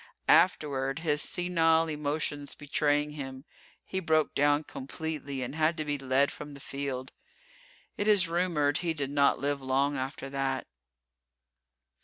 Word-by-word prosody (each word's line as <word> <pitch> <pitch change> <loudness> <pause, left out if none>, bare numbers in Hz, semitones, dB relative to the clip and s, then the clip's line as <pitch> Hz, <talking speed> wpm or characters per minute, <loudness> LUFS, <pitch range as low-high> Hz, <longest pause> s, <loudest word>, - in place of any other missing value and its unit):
Afterward, 145 -5 +3
his 150 -3 +1
senile 165 -2 +2
emotions 145 -1 -2
betraying 145 0 0
him, 135 -2 -7 0.4
he 190 - -3
broke 160 -3 +1
down 145 +1 +3
completely 140 -1 -5
and 125 - -5
had 160 +2 +1
to 155 - -2
be 145 -1 -2
led 135 +1 +2
from 145 -1 -9
the - - -11
field. 135 -1 -5 0.9
It 205 - -1
is 205 -4 +6
rumored 165 -4 +1
he 170 -2 -1
did 140 -2 -3
not 140 -1 +4
live 140 0 -1
long 135 +2 +1
after 135 +1 -4
that. 135 -1 -1
145 Hz, 140 wpm, -29 LUFS, 140-160 Hz, 0.9 s, is